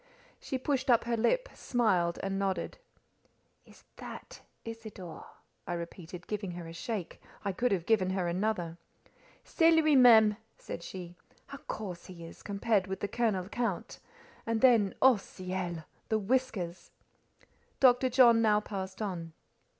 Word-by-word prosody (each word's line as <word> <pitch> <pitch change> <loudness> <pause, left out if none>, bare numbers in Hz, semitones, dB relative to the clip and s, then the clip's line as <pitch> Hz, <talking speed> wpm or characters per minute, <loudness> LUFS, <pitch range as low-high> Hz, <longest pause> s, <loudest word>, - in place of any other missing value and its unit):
She 265 - -3
pushed 265 0 -1
up 235 -2 +5
her 235 0 -1
lip, 370 - +1
smiled, 190 -9 +1
and 195 0 -2
nodded. 190 - -2 0.9
"Is - - -18
that - - -9 0.2
Isidore?" 220 -7 -8 0.4
I - - -2
repeated, 170 +1 -7
giving 205 -4 -4
her 175 -1 -7
a 165 - -9
shake: 195 +1 -5 0.2
I 200 - +1
could 240 +6 0
have 180 -4 0
given 200 -4 +2
her 185 -2 -1
a 170 - -1
dozen. 180 -4 -2 0.6
"C'est 330 -2 +3
lui 310 -2 +4
même," 220 -5 +7 0.2
said - - -7
she. 175 0 -8 0.3
"How 280 - -10
coarse 185 -5 -6
he 170 -2 -10
is, 165 - -12
compared 200 -1 0
with 190 0 -5
the 205 - -1
Colonel 205 -4 0
Count! 225 -1 -3 0.5
And 230 -1 0
then—oh 240 0 +5
ciel!—the 185 +1 -5
whiskers!" 210 -6 -2 0.9
Dr. 255 0 +5
John 240 -2 +6
now 210 -2 +4
passed 195 -1 -5
on. 170 -5 -5
205 Hz, 140 wpm, -31 LUFS, 180-235 Hz, 0.9 s, même